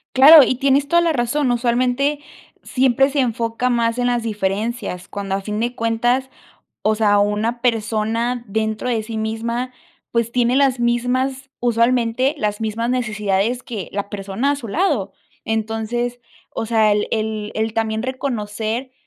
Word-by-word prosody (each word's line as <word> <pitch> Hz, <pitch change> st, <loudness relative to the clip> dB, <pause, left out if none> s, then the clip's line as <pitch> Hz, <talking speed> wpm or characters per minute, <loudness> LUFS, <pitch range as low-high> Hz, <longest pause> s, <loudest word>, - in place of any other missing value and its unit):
Claro, 290 Hz, +3 st, +10 dB
y 255 Hz, -, +1 dB
tienes 275 Hz, +2 st, +2 dB
toda 340 Hz, +3 st, +4 dB
la 335 Hz, -1 st, +2 dB
razón. 255 Hz, +2 st, 0 dB
Usualmente 250 Hz, +4 st, +1 dB, 0.4 s
siempre 265 Hz, +1 st, +2 dB
se 285 Hz, +1 st, -1 dB
enfoca 230 Hz, 0 st, -1 dB
más 235 Hz, -1 st, +1 dB
en 245 Hz, 0 st, +1 dB
las 240 Hz, -1 st, 0 dB
diferencias 210 Hz, -2 st, -3 dB
cuando 200 Hz, -1 st, -4 dB
a 195 Hz, -, -3 dB
fin 210 Hz, +1 st, -4 dB
de 240 Hz, +1 st, -1 dB
cuentas, 240 Hz, +3 st, 0 dB, 0.5 s
o 215 Hz, -, +2 dB
sea, 210 Hz, -2 st, +3 dB
una 210 Hz, +4 st, 0 dB
persona 230 Hz, +1 st, 0 dB
dentro 220 Hz, +3 st, -2 dB
de 230 Hz, -3 st, 0 dB
sí 220 Hz, 0 st, -5 dB
misma, 230 Hz, +3 st, -3 dB, 0.4 s
pues 235 Hz, -1 st, 0 dB
tiene 245 Hz, +1 st, +2 dB
las 270 Hz, -3 st, +2 dB
mismas 255 Hz, +3 st, 0 dB
usualmente 240 Hz, +2 st, +2 dB
las 210 Hz, -2 st, -2 dB
mismas 225 Hz, +1 st, -2 dB
necesidades 215 Hz, -1 st, 0 dB
que 215 Hz, -7 st, -6 dB
la 200 Hz, 0 st, -3 dB
persona 200 Hz, +7 st, -2 dB
a -, -, -2 dB
su 245 Hz, -5 st, -8 dB
lado. 270 Hz, -, 0 dB, 0.3 s
Entonces, 225 Hz, +2 st, -2 dB, 0.3 s
o -, -, -4 dB
sea, 220 Hz, -2 st, +3 dB
el 210 Hz, 0 st, +1 dB
el 215 Hz, -1 st, -2 dB
el 220 Hz, 0 st, -1 dB
también 220 Hz, -1 st, -1 dB
reconocer 240 Hz, -1 st, -3 dB
235 Hz, 155 wpm, -20 LUFS, 220-250 Hz, 0.5 s, Claro